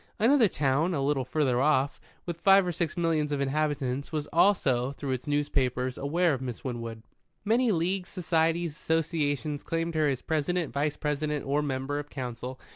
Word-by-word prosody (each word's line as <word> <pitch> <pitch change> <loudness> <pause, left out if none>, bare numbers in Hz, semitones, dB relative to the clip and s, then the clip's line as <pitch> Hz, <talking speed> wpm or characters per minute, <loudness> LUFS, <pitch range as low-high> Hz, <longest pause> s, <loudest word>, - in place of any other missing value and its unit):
Another 235 +1 +5
town, 150 +2 +1
a 140 - -1
little 135 -2 +1
further 130 -2 +1
off, 140 -1 +2 0.2
with 170 -1 -5
five 195 +1 +6
or 180 - -1
six 170 -1 -2
millions 160 -3 +1
of 145 - -1
inhabitants, 140 -1 -1
was 155 -2 -2
also, 140 -9 +3
through 140 -1 -5
its 130 +3 -3
newspapers, 130 -3 0
aware 165 +4 +1
of 130 - -3
Miss 125 -3 -5
Winwood. 115 -3 -5 0.4
Many 235 +2 +3
leagues, 180 +1 -1
societies, 165 -1 0
associations, 150 -2 -1
claimed 165 0 -2
her 155 -1 +2
as 135 -3 -1
President, 160 +1 -1
Vice 145 +1 -1
President, 150 0 -2
or 145 +2 +1
Member 140 0 -2
of 145 0 -7
Council. 125 -1 -6
150 Hz, 170 wpm, -28 LUFS, 135-165 Hz, 0.4 s, five